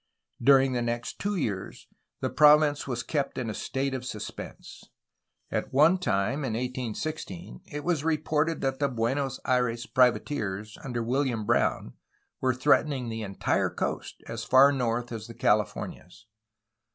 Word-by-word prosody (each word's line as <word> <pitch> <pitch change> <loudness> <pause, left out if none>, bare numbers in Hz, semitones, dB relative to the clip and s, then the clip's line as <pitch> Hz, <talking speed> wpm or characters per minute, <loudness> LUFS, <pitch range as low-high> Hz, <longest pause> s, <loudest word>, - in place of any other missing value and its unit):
During 135 +1 +5
the 120 - 0
next 120 0 -3
two 205 0 -1
years 105 - -4 0.3
the - - -1
province 150 -1 +5
was 120 -3 -2
kept 145 -3 -2
in 120 -4 -2
a - - -5
state 135 +5 -2
of 130 -1 -3
suspense. 110 -5 -8 0.7
At - - -2
one 160 +6 +5
time 120 - 0
in 125 -5 -2
1816 125 - -4
it 150 0 -5
was 170 -5 0
re 160 -1 +2
ported 155 +2 0
that 135 -1 -1
the 140 - +2
Buenos 135 +2 -1
Aires 125 -2 +1
privateers, 115 -5 +1
under 120 -3 -3
William 125 -2 0
Brown, - - +1 0.5
were 130 -1 +1
threatening 135 -1 +2
the 115 0 -4
entire 100 -2 0
coast - - -4
as 115 0 -5
far 135 +4 +6
north 120 -3 -1
as 110 -1 -6
the 115 - -10
Californias. 105 -1 -1
125 Hz, 150 wpm, -28 LUFS, 115-140 Hz, 0.7 s, far